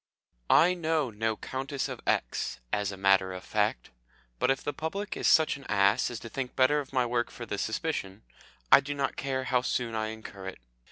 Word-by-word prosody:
I 180 +2 +6
know 160 -6 0
no 110 +1 -1
Countess 135 +1 -3
of - - -7
X., - - 0
as 105 -1 0
a 95 - -8
matter 95 -1 +3
of 90 - -7
fact, - - -1 0.5
but - - +2
if 135 +1 +1
the 145 - -2
public 190 +8 -4
is - - 0
such 155 -2 +4
an 140 - -14
ass 100 +3 +3
as 120 - -5
to - - -7
think 130 +1 -4
better 135 +3 +4
of 140 - -7
my 130 -2 +2
work 120 0 0
for 120 - -8
the 100 -3 -4
suspicion, 110 - -3 0.5
I - - +10
do 145 +1 -4
not 140 -1 -1
care 135 -1 -2
how 130 -1 +2
soon 120 -2 -1
I 110 0 -1
incur 110 -3 -8
it. 95 - -7
125 Hz, 210 wpm, -29 LUFS, 105-140 Hz, 0.5 s, I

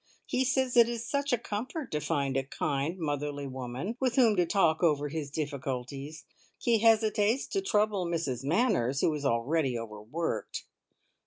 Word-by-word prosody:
He 255 - +1
says 255 0 +1
it 235 -1 +7
is 235 -1 -4
such 280 0 -1
a 245 - +3
comfort 240 +6 -5
to 150 - 0
find 140 -3 -1
a 135 - +3
kind, 145 +4 -2
motherly 145 -3 -3
woman 130 - -5
with 255 -2 +1
whom 235 -5 +5
to 175 -1 +3
talk 165 -4 +2
over 150 -4 +2
his 150 -1 -4
difficulties! 140 0 -4 0.3
He 235 -2 +2
hesitates 220 +1 +3
to 390 - 0
trouble 210 - +1
Mrs 160 -7 -2
Manners, 145 - +1
who 160 - +3
is 145 -1 -4
already 130 +2 +1
overworked. 115 +8 -4
160 Hz, 160 wpm, -30 LUFS, 140-225 Hz, 0.3 s, it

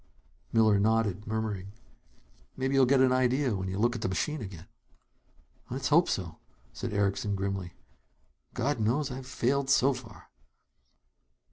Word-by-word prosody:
Miller 110 -3 +4
nodded, 105 -1 +1
murmuring: 105 -3 -3 0.8
"Maybe 135 +1 -1
you'll 135 -2 +5
get 135 0 +4
an 130 -1 +5
idea 130 -1 +2
when 95 -1 -3
you 95 0 -3
look 120 +3 +2
at 115 - -5
the - - -1
machine 150 +9 -2
again." 95 -5 -8 1.0
"Let's 130 +3 -2
hope 165 +4 +4
so," 85 -4 -3 0.3
said - - -5
Erickson 100 0 0
grimly. 95 -2 -3 0.8
"God 140 +1 0
knows 130 +7 0
I've 130 0 -7
failed 135 +2 0
so 135 +1 +4
far!" 125 -4 -12
115 Hz, 140 wpm, -29 LUFS, 100-130 Hz, 1.0 s, you'll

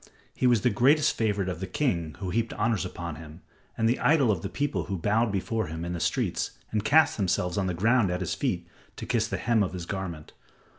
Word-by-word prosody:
He 125 - +1
was 120 -4 +4
the 125 - +2
greatest 140 +8 +3
favorite 105 -4 0
of 90 -3 -3
the 95 - -4
king 90 - -1
who 95 -1 -4
heaped 115 +2 -1
honors 110 -3 0
upon 85 -3 -6
him, 80 +2 -11 0.4
and 115 - +2
the 120 - +1
idol 145 -7 +4
of 90 -5 -1
the 100 - -4
people 145 +5 -2
who 100 -2 -3
bowed 105 +6 +1
before 110 +3 -1
him 80 +2 -5
in 85 - -3
the 85 - -4
streets - - -1
and 105 -1 0
cast 155 +9 +4
themselves 90 -3 0
on 95 -2 0
the 90 - -2
ground 110 +3 +3
at 90 +1 -2
his 90 - -1
feet - - -2 0.3
to - - -7
kiss - - +1
the - - -3
hem 115 -2 +2
of 95 -3 -1
his 90 -2 -5
garment. 90 -5 -5
100 Hz, 235 wpm, -27 LUFS, 90-115 Hz, 0.4 s, was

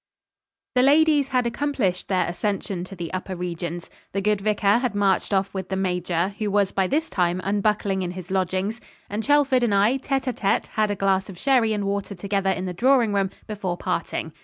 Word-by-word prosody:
The 250 - +4
ladies 290 +1 +4
had 250 -2 +1
accomplished 235 -7 -1
their 185 -2 +1
ascension 190 0 -2
to 195 - -10
the 170 -1 -6
upper 185 0 -4
regions. 175 -1 -5 0.3
The 195 - 0
good 210 0 +1
vicar 205 +1 +2
had 245 -5 -2
marched 195 -2 +1
off 195 0 +1
with 190 -2 -5
the 190 - -1
major, 180 -1 0
who 210 -1 -1
was 200 -1 +2
by 190 -1 +1
this 315 - 0
time 180 -1 0
unbuckling 200 -1 0
in 180 - -2
his 180 0 -8
lodgings; 190 +4 -1 0.3
and 210 +2 -1
Chelford 280 -1 +3
and 225 -4 +2
I, 215 +7 +3
tête 270 0 -1
à 255 -2 -2
tête, 200 -3 0
had 215 -1 0
a 205 - 0
glass 195 0 +1
of 185 - -9
sherry 250 -2 +3
and 205 -2 -1
water 200 0 -2
together 195 +1 -1
in 185 -1 -1
the 180 - -3
drawing 240 +1 +3
room 195 -1 +1 0.2
before 195 -5 -3
parting. 165 -2 -3
200 Hz, 205 wpm, -24 LUFS, 185-225 Hz, 0.3 s, The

